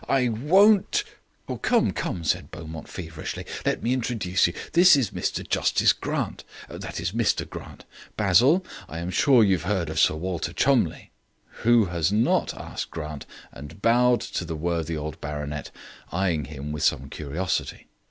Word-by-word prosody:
I 130 -3 +3
won't 190 - +4 0.3
" - - -8
"Come, - - +2
come," 85 - -4
said 80 - 0
Beaumont 80 0 -8
feverishly. 80 -4 -6 0.2
"Let - - 0
me 120 - +1
introduce 115 -9 +1
you. 85 - -4 0.2
This 175 0 +7
is 130 -8 0
Mr - - -3
Justice - - +3
Grant - - -3 0.2
that - - -7
is, 85 +1 -2
Mr 115 +1 0
Grant. - - -10 0.3
Basil, 125 - +4 0.2
I 80 - -6
am 85 +2 -4
sure 125 +2 +5
you 100 -2 +4
have 80 - -8
heard 95 -6 0
of 80 - -2
Sir - - +4
Walter 90 +1 -3
Cholmondeliegh." - - +1 0.6
"Who 120 -2 +5
has 85 -1 0
not?" 110 +3 +2
asked - - -6
Grant, 75 -2 -7 0.2
and 75 +5 -11
bowed 120 +3 +3
to - - -4
the 80 -1 -5
worthy 85 0 -2
old 75 +1 -6
baronet, 75 0 -5 0.4
eyeing 85 -5 0
him 75 0 -7
with 75 -1 -4
some 65 +1 +1
curiosity. 75 +6 -3
90 Hz, 160 wpm, -25 LUFS, 80-115 Hz, 0.6 s, This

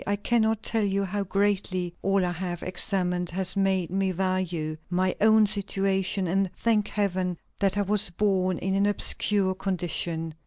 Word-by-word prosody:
I 205 - +1
cannot 220 +1 +1
tell 225 -2 +2
you 200 0 0
how 200 +1 -2
greatly 190 -2 0
all 195 -1 +2
I 175 - -1
have 175 -1 -4
examined 180 -1 -1
has 185 +2 -1
made 190 -3 +1
me 190 0 0
value 180 -4 -2
my 185 +1 0
own 220 0 +6
situation, 195 -1 0
and 190 +2 +1
thank 215 -3 +1
Heaven 185 -4 -1 0.2
that 195 -1 +1
I 205 - +2
was 200 -1 0
born 185 -1 +1
in 190 +1 -2
an 200 +1 +2
obscure 205 -1 +2
condition. 170 -3 -3
190 Hz, 160 wpm, -26 LUFS, 180-200 Hz, 0.2 s, own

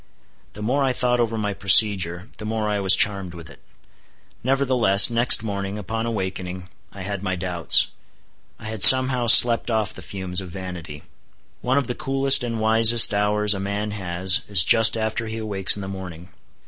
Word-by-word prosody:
The 105 - -11
more 135 +6 -2
I 130 -1 -2
thought 125 -1 -2
over 115 -1 -3
my 105 -2 -4
procedure, 95 -2 +2
the - - -9
more 110 0 -5
I 105 -1 -3
was 95 -1 +3
charmed 95 -4 -2
with 85 -3 -13
it. - - -18 0.8
Nevertheless, 125 -6 +2
next 115 -1 +3
morning, 100 -1 -6
upon 115 +3 -6
awakening, 95 -4 -7 0.2
I 100 - -11
had 100 -1 -7
my 95 -2 -5
doubts,—I 90 +2 -3
had 110 -2 -8
somehow 130 +2 +6
slept 115 +1 +5
off 110 -3 -3
the - - -13
fumes 95 0 -7
of 95 - -11
vanity. 85 -5 -10 0.6
One 130 +2 -2
of 140 - -2
the 125 - -6
coolest 135 -1 +1
and 115 -2 -6
wisest 110 +1 +3
hours 105 +1 0
a 100 - -7
man 100 +2 -6
has, 95 -1 -1
is 95 -5 +3
just 115 0 +2
after 110 +1 -5
he 110 +1 -8
awakes 100 -3 -2
in 100 - -9
the - - -8
morning. 90 -3 -11
105 Hz, 175 wpm, -20 LUFS, 95-115 Hz, 0.8 s, somehow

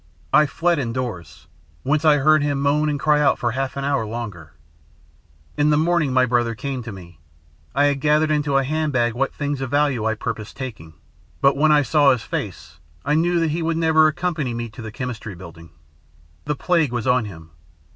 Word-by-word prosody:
I 150 0 +5
fled 170 +3 0
indoors, 115 - -5 0.4
whence 150 +3 +1
I 155 -2 +5
heard 155 +2 +4
him 145 -1 -1
moan 145 +2 +1
and 145 -1 -2
cry 150 0 +3
out 140 - +3
for 120 - -1
half 135 +2 -3
an 140 - -3
hour 140 -4 0
longer. 105 -9 -7 1.0
"In 150 0 +3
the 150 - +3
morning, 160 -3 +1
my 130 0 +3
brother 120 -1 0
came 135 +3 -4
to 115 -1 -7
me. 85 -5 -12 0.6
I 140 - +3
had 140 -1 0
gathered 155 +1 +2
into 145 -2 +1
a 135 - +2
handbag 135 -5 0
what 135 +3 -1
things 145 -2 -3
of 135 - -3
value 145 -4 +1
I 110 0 +1
purposed 110 0 -6
taking, 110 -12 -8 0.4
but 140 0 +4
when 155 +2 +3
I 150 -1 +5
saw 145 0 +4
his 125 -4 -1
face 75 -6 -6 0.3
I - - +1
knew 170 +3 +2
that 165 -2 +1
he 165 +3 -2
would 165 0 -1
never 160 -1 +4
accompany 155 -6 -2
me 115 0 -4
to 120 +3 -11
the 110 -1 -7
Chemistry 115 -5 -6
Building. 85 -2 -12 0.8
The 150 0 -1
plague 165 -4 +1
was 120 -1 -3
on 125 -2 +2
him. 80 -5 -11
135 Hz, 200 wpm, -21 LUFS, 115-150 Hz, 1.0 s, I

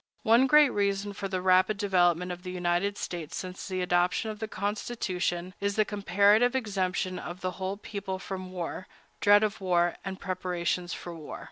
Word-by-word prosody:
One 240 +2 +5
great 300 -1 +6
reason 200 0 0
for 195 0 -4
the 185 -1 -3
rapid 185 +3 +4
development 180 -3 +2
of 180 0 -6
the 180 - -7
United 180 +3 0
States 170 -4 -5
since 185 0 -6
the 185 -2 -2
adoption 180 +4 +1
of 210 - -9
the 220 - -3
Constitution 185 -4 -2
is 200 0 -1
the 215 - +3
comparative 205 +4 +3
exemption 185 -6 -1
of 175 +1 -7
the 185 - -1
whole 190 +1 -4
people 200 -2 -5
from 185 0 -6
war, 185 +1 -5 0.3
dread 205 +1 +6
of 210 -1 -1
war, 175 -2 +2
and 195 -1 -5
preparations 180 -2 -2
for 175 - -6
war. 160 -3 -8
185 Hz, 175 wpm, -28 LUFS, 180-205 Hz, 0.3 s, great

